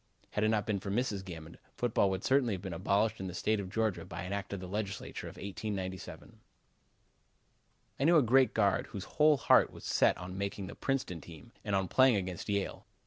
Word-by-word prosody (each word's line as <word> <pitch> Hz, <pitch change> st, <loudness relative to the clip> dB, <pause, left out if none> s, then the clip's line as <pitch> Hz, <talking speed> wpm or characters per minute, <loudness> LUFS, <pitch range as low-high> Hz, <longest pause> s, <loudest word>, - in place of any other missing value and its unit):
Had 105 Hz, -, 0 dB
it 110 Hz, -, +3 dB
not 105 Hz, -2 st, +1 dB
been 105 Hz, -2 st, -1 dB
for 100 Hz, -, -6 dB
Mrs. 105 Hz, -2 st, -1 dB
Gammon, 85 Hz, -3 st, -9 dB, 0.2 s
football 115 Hz, -5 st, +2 dB
would 95 Hz, 0 st, -3 dB
certainly 130 Hz, -6 st, +3 dB
have 90 Hz, -, -8 dB
been 95 Hz, -3 st, -4 dB
abolished 100 Hz, +5 st, +1 dB
in 95 Hz, -, -4 dB
the 90 Hz, -, -6 dB
State 110 Hz, +3 st, +1 dB
of 95 Hz, -2 st, -5 dB
Georgia 110 Hz, -1 st, 0 dB
by -, -, -7 dB
an 90 Hz, +2 st, -4 dB
act 100 Hz, 0 st, -4 dB
of 100 Hz, -, -3 dB
the 90 Hz, -, -7 dB
Legislature 100 Hz, 0 st, -4 dB
of -, -, -9 dB
1897. 95 Hz, -2 st, -6 dB, 1.6 s
I -, -, +1 dB
knew 170 Hz, +1 st, +6 dB
a 150 Hz, -, +5 dB
great 130 Hz, +3 st, +4 dB
guard 100 Hz, -3 st, +2 dB
whose 100 Hz, -, -6 dB
whole 150 Hz, -1 st, +4 dB
heart 120 Hz, -, +5 dB
was -, -, -12 dB
set -, -, +3 dB
on 90 Hz, +2 st, -7 dB
making 100 Hz, 0 st, -3 dB
the -, -, -7 dB
Princeton 130 Hz, -, -2 dB
team, 85 Hz, +8 st, -13 dB
and 105 Hz, -2 st, 0 dB
on 95 Hz, -1 st, +1 dB
playing 130 Hz, +4 st, +5 dB
against 95 Hz, -1 st, -3 dB
Yale. 100 Hz, -1 st, -2 dB
100 Hz, 210 wpm, -32 LUFS, 95-110 Hz, 1.6 s, knew